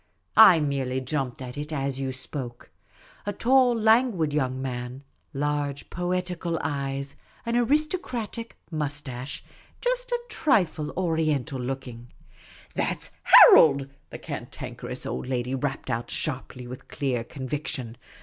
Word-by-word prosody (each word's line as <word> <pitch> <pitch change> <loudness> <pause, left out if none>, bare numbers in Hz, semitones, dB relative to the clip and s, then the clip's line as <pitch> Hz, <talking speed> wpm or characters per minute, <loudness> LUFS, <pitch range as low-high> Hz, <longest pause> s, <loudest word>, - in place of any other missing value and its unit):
I 195 -6 +9
merely 135 -3 -1
jumped 130 -1 -3
at 125 +2 -7
it 150 +1 -6
as 135 -2 -2
you 135 -1 -2
spoke. 130 -2 -6 0.6
A - - +1
tall, 250 +3 +4
languid 220 - +3
young 130 -3 0
man; 125 0 -5 0.3
large, 145 -1 -2
poetical 180 -1 -2
eyes; 140 -2 -3 0.3
an 235 0 -1
artistic 245 - -1
moustache— 145 -4 -4 0.4
just - - -1
a 485 - +1
trifle 200 - +1
Oriental 160 -6 0
looking." 125 -2 -5 0.3
" - - -22
That - - -1
's - - -8
Harold! 140 -3 +8
" - - -39
the - - -7
Cantankerous - - -7
Old - - -4
Lady 125 0 -2
rapped 135 +1 -2
out 115 +1 -2
sharply, 125 -1 -3
with 125 +1 -9
clear 130 -5 -2
conviction. 130 -1 -5
145 Hz, 130 wpm, -26 LUFS, 130-180 Hz, 0.6 s, I